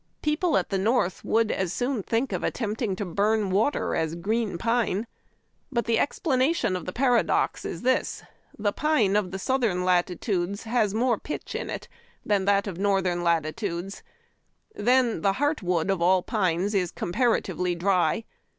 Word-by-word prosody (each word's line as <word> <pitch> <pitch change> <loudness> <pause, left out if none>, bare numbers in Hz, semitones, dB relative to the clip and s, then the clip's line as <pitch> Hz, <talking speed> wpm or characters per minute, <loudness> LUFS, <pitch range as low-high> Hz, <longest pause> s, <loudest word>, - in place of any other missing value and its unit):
People 305 +2 +2
at - - -1
the 195 - +1
North 210 -3 +1
would 225 -1 +2
as 190 -3 -1
soon 250 -2 -1
think 230 +6 -1
of - - -2
attempting 220 -3 -2
to 205 - -4
burn 205 +3 +1
water 220 +10 +1
as 160 0 -1
green 210 +2 -1
pine. 230 0 0 0.7
But 235 -3 0
the 230 -1 +2
explanation 285 - +1
of 180 - -5
the - - -2
paradox 245 +1 +1
is - - -5
this 260 +1 0 0.2
— - - -40
the 205 -1 0
pine 255 -11 +2
of 190 -2 -1
southern 220 -7 0
latitudes 180 +2 0
has 220 -3 0
more 235 -1 +2
pitch 300 - -6
in - - -4
it - - -5 0.4
than 200 -2 +1
that 200 0 +3
of 190 -4 -6
northern 190 -3 +1
latitudes. 170 +3 -1 0.7
Then, 245 - +2
the 195 +2 +2
heart 290 +7 0
wood 180 0 0
of 190 -3 -1
all 180 +1 +4
pines 190 -1 0
is 185 -3 +1
comparatively 180 -3 0
dry. 180 +2 +1
205 Hz, 160 wpm, -26 LUFS, 180-235 Hz, 0.7 s, all